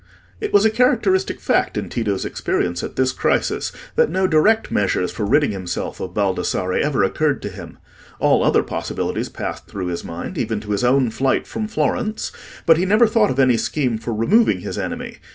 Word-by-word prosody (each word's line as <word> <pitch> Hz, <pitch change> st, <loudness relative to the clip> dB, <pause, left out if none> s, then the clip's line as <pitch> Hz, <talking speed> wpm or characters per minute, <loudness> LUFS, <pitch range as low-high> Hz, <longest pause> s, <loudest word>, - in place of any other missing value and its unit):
It 425 Hz, -, -3 dB
was 205 Hz, +1 st, +5 dB
a 220 Hz, -, +4 dB
characteristic 220 Hz, -5 st, +2 dB
fact -, -, 0 dB
in -, -, -3 dB
Tito's 105 Hz, -5 st, -2 dB
experience 85 Hz, -1 st, -2 dB
at -, -, -6 dB
this 130 Hz, 0 st, +2 dB
crisis, -, -, 0 dB, 0.2 s
that 475 Hz, 0 st, +3 dB
no 190 Hz, 0 st, +1 dB
direct 185 Hz, +7 st, +3 dB
measures 95 Hz, -2 st, 0 dB
for 105 Hz, -, -3 dB
ridding 145 Hz, +2 st, +3 dB
himself 95 Hz, -3 st, -4 dB
of 90 Hz, -1 st, -6 dB
Baldassarre 95 Hz, -2 st, 0 dB
ever 145 Hz, -7 st, +1 dB
occurred 145 Hz, +9 st, +1 dB
to 105 Hz, -, -3 dB
him. 90 Hz, -, -10 dB, 0.4 s
All -, -, +3 dB
other -, -, +3 dB
possibilities -, -, -3 dB
passed -, -, -6 dB
through 95 Hz, -2 st, -5 dB
his 85 Hz, -, -4 dB
mind, 85 Hz, +1 st, -6 dB
even 110 Hz, -2 st, -1 dB
to 105 Hz, -1 st, -7 dB
his 105 Hz, +4 st, 0 dB
own 125 Hz, -1 st, +3 dB
flight 130 Hz, +4 st, 0 dB
from 215 Hz, -, -4 dB
Florence; 215 Hz, 0 st, -1 dB, 0.3 s
but 165 Hz, -1 st, +6 dB
he 175 Hz, -, +1 dB
never 215 Hz, +4 st, +5 dB
thought 220 Hz, -1 st, +3 dB
of 130 Hz, -, -2 dB
any 130 Hz, -3 st, +4 dB
scheme 125 Hz, -3 st, -1 dB
for 115 Hz, +1 st, -4 dB
removing 180 Hz, -, +2 dB
his -, -, -5 dB
enemy. -, -, -5 dB
130 Hz, 190 wpm, -20 LUFS, -, 0.4 s, but